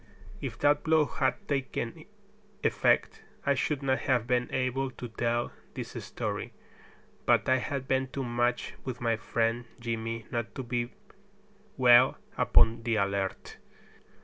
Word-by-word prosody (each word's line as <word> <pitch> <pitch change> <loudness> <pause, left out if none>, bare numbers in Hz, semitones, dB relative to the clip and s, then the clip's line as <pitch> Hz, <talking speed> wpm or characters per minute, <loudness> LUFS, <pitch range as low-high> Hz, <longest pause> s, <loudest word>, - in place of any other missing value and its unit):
If 125 -4 -4
that 145 0 +3
blow 160 -1 +4
had 135 -2 -1
taken 135 -2 -3 0.6
effect - - +2 0.2
I 140 - +4
should 140 +2 -1
not 130 -1 +2
have 125 -4 +1
been 125 0 0
able 130 +1 0
to 125 -1 -8
tell 120 +2 -1 0.2
this - - -5
story. - - -4 0.7
But - - +4
I 130 - +5
had 135 0 -3
been 130 0 +1
too 135 +1 -4
much 120 0 0
with 130 -2 -5
my 115 -1 +1
friend 115 +1 -1
Jimmy 115 -1 -3
not 120 -1 -3
to 135 - -4
be 120 0 -2 0.9
well 125 0 +6 0.2
upon 115 0 +4
the 115 -1 0
alert. 100 -2 -1
125 Hz, 140 wpm, -29 LUFS, 115-130 Hz, 0.9 s, well